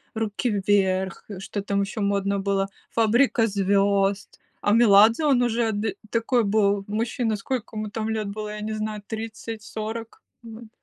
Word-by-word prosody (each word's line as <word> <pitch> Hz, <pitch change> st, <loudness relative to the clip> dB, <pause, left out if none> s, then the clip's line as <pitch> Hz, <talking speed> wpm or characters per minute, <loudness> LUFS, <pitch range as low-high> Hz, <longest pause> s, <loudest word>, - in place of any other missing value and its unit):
"Руки 220 Hz, +2 st, -1 dB
Вверх", 190 Hz, -2 st, +1 dB
что 200 Hz, +1 st, -5 dB
там 200 Hz, 0 st, -1 dB
еще 215 Hz, +3 st, -5 dB
модно 200 Hz, 0 st, 0 dB
было, 195 Hz, 0 st, 0 dB, 0.2 s
"Фабрика 230 Hz, +1 st, +3 dB
звезд". 200 Hz, -1 st, +1 dB, 0.2 s
А 205 Hz, -, +1 dB
Меладзе, 225 Hz, +4 st, +6 dB
он 260 Hz, -4 st, +4 dB
уже 230 Hz, -1 st, +1 dB
ды 205 Hz, -1 st, -2 dB
такой 230 Hz, +1 st, +1 dB
был 200 Hz, -1 st, +2 dB
мужчина, 225 Hz, +1 st, -1 dB
сколько 225 Hz, +2 st, -4 dB
ему 215 Hz, -1 st, -4 dB
там 220 Hz, 0 st, -3 dB
лет 220 Hz, -2 st, -2 dB
было, 210 Hz, +1 st, -5 dB
я 210 Hz, 0 st, -6 dB
не 215 Hz, +1 st, -3 dB
знаю, 215 Hz, -1 st, -4 dB
30-40? 225 Hz, 0 st, -6 dB, 0.2 s
Мгм. 225 Hz, -1 st, -11 dB
215 Hz, 150 wpm, -24 LUFS, 200-225 Hz, 0.2 s, Меладзе